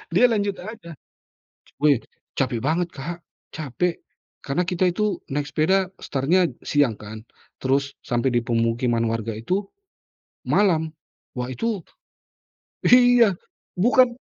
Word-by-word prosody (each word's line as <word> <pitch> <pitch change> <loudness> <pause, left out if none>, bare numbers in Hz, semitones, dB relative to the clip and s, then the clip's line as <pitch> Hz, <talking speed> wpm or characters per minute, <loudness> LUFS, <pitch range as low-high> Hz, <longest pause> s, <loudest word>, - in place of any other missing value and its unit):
dia 235 - +6
lanjut 205 -2 0
aja. 215 -3 -9 0.9
Weh, 145 -5 +5 0.4
capek 130 -4 0
banget 165 +5 +1
Kak, 170 +5 -6 0.3
capek. 160 +4 -2 0.5
Karena 140 +5 -1
kita 180 +1 +1
itu 210 +3 -1
naik 145 +1 -1
sepeda 185 +5 +2
startnya 160 +7 +2 0.2
siang 145 -6 +2
kan. 110 +1 -9 0.4
Terus 140 +1 0
sampe 120 +1 0
di 120 -2 +1
pemukiman 115 0 +1
warga 115 0 -2
itu, 150 - -2 0.8
malam. 165 -6 +3 0.5
Wah 125 0 -2
itu 205 - -2 1.0
iya, 245 -4 +6 0.4
bukan 240 +5 +4
155 Hz, 115 wpm, -23 LUFS, 125-195 Hz, 1.0 s, dia